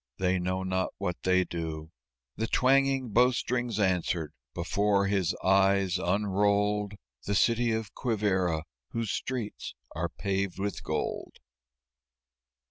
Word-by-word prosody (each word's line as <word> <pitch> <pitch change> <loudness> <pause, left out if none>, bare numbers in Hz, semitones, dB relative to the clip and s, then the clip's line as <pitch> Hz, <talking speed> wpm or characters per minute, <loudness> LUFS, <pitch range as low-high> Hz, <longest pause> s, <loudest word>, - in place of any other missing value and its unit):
they 95 0 +1
know 90 +1 -1
not 95 0 0
what 95 -3 -2
they 95 0 +3
do!" 80 -2 -5 0.4
The 115 - -2
twanging 135 0 +3
bow 120 +4 +5
strings 120 -3 -1
answered. 90 -5 0 0.2
Before 100 -1 +1
his 95 -4 +1
eyes, 95 -1 +3
unrolled 105 +2 +1 0.3
The 100 - +1
City 115 +6 +3
of 110 -3 -3
Quivíra 95 - 0 0.3
whose 115 -3 -1
streets 125 -5 -4 0.2
are 85 +2 -1
paved 95 +2 -2
with 100 -2 -3
gold. - - -3
100 Hz, 120 wpm, -29 LUFS, 90-110 Hz, 0.4 s, bow